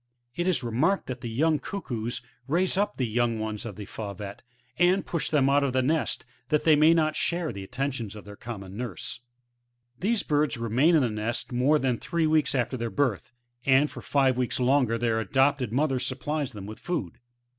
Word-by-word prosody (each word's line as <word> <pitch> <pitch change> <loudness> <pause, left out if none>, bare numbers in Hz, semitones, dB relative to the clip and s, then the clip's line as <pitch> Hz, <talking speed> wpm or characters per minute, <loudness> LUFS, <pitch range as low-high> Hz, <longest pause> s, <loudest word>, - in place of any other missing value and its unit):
It 175 +1 -1
is 165 -9 +1
remarked 125 - +1
that 125 -2 -6
the 120 - -4
young 155 +6 +2
Cuckoos 120 - -4 0.2
raise 175 +7 +2
up 205 +2 0
the 130 - +1
young 115 0 +1
ones 110 0 -4
of 105 - -7
the 105 - -7
Fauvette, 100 -1 -7 0.4
and 180 +2 +4
push 170 - -2
them 145 -4 +3
6ut 140 +1 +4
of 140 -2 0
the 130 0 +2
nest, 150 -2 0 0.2
that 150 - +2
they 160 -2 +6
may 155 +3 +6
not 155 -2 +2
share 170 -6 -1
the 100 -1 -6
attentions 125 -1 -3
of 105 - -10
their 100 0 -10
common 100 -4 -8
nurse. 120 0 -5 0.8
These 215 +3 +1
birds 150 -3 +1
remain 120 +9 +3
in 150 - +4
the 120 - 0
nest 110 +4 -3
more 130 +5 +3
than 130 -4 0
three 170 -1 0
weeks 155 -2 +2
after 130 0 0
their 115 -1 -2
birth, 125 -6 -1 0.3
and 135 +3 +4
for - - -8
five 135 -3 +2
weeks 125 0 0
longer 125 -2 +3
their 115 -1 +1
adopted 130 +2 +2
mother 135 +1 +1
supplies 130 +2 -2
them 100 -2 -7
with 110 +1 -8
food. 160 - -3
130 Hz, 200 wpm, -27 LUFS, 115-150 Hz, 0.8 s, they